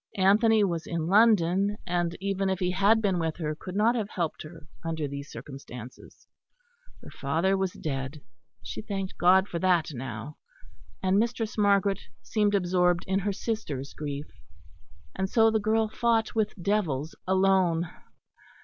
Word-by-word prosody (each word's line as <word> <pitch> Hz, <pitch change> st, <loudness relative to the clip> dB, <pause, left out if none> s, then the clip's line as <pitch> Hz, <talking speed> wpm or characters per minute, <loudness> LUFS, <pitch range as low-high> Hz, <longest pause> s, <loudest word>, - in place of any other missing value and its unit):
Anthony 210 Hz, +3 st, +4 dB
was 170 Hz, -4 st, -1 dB
in 165 Hz, -2 st, -2 dB
London; 200 Hz, 0 st, +4 dB
and 175 Hz, -1 st, -1 dB
even 195 Hz, 0 st, -1 dB
if 190 Hz, -, 0 dB
he 180 Hz, -1 st, 0 dB
had 205 Hz, +4 st, +3 dB
been 190 Hz, -4 st, +1 dB
with 160 Hz, -1 st, -1 dB
her 155 Hz, -3 st, -2 dB
could 185 Hz, +4 st, -8 dB
not 220 Hz, +3 st, +4 dB
have 220 Hz, -4 st, -2 dB
helped 170 Hz, -6 st, -3 dB
her 160 Hz, 0 st, -11 dB, 0.2 s
under 160 Hz, -2 st, -2 dB
these 140 Hz, +1 st, -7 dB
circumstances; 125 Hz, -4 st, -10 dB, 0.8 s
her -, -, -11 dB
father 165 Hz, +8 st, 0 dB
was 190 Hz, -1 st, -1 dB
dead 135 Hz, 0 st, -5 dB, 0.4 s
she -, -, -6 dB
thanked 195 Hz, -3 st, -5 dB
God 190 Hz, +2 st, +5 dB
for 170 Hz, -, -4 dB
that 175 Hz, -3 st, +2 dB
now 120 Hz, +2 st, -6 dB, 0.7 s
and 190 Hz, +1 st, +3 dB
Mistress 230 Hz, 0 st, -1 dB
Margaret 200 Hz, -2 st, +3 dB, 0.2 s
seemed 205 Hz, -, +1 dB
absorbed 180 Hz, -2 st, +2 dB
in 190 Hz, +1 st, +1 dB
her 200 Hz, +1 st, -1 dB
sister's 170 Hz, -, -4 dB
grief. 145 Hz, -1 st, -5 dB, 0.9 s
And 190 Hz, 0 st, -1 dB
so 225 Hz, +1 st, +4 dB
the 220 Hz, -, +2 dB
girl 220 Hz, +1 st, +1 dB
fought 225 Hz, 0 st, +1 dB
with 215 Hz, -1 st, 0 dB
devils 170 Hz, -7 st, -1 dB
alone. 185 Hz, -3 st, +3 dB
185 Hz, 150 wpm, -27 LUFS, 160-205 Hz, 0.9 s, God